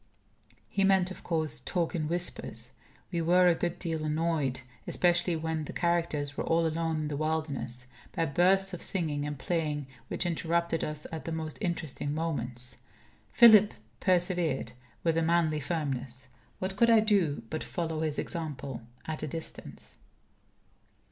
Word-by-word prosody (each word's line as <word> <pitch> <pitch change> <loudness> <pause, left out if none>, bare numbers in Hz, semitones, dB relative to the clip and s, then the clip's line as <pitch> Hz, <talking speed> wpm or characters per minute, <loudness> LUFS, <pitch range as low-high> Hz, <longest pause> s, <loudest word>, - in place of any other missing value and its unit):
He 195 - 0
meant, 190 -1 +4
of - - -9
course, 160 -6 -1
talk 170 +6 -1
in 155 -4 -1
whispers. 160 -8 -2 0.4
We 170 -2 0
were 180 +2 +5
a 175 - +6
good 175 +1 -2
deal 165 -3 -3
annoyed 155 -4 0 0.3
especially 175 0 +2
when 160 -1 -2
the - - -7
characters 165 -5 0
were - - -2
all 165 0 +2
alone 160 0 -1
in 150 - -2
the 150 - -3
wilderness 140 -5 -1 0.2
by 165 -3 +1
bursts 185 +6 +3
of 180 - -5
singing 150 -6 -1
and 145 -1 -4
playing 150 -1 -1 0.2
which - - 0
interrupted 170 0 0
us 150 0 -3
at 160 -1 -6
the 165 - -3
most 160 -1 -4
interesting 160 -6 -2
moments. 125 -7 -4 0.5
Philip 215 - +8 0.2
persevered 175 -5 +1 0.3
with 165 -1 +2
a - - +3
manly 160 -2 +2
firmness. 135 -4 -3 0.3
What 190 +1 -2
could 235 +2 +5
I 225 -1 +7
do 195 - +2
but 155 - -2
follow 160 -3 -3
his 155 -2 +1
example 145 -6 -3 0.2
at 155 -1 -4
a 155 - -2
distance? 160 +3 -8
160 Hz, 155 wpm, -30 LUFS, 150-175 Hz, 0.5 s, Philip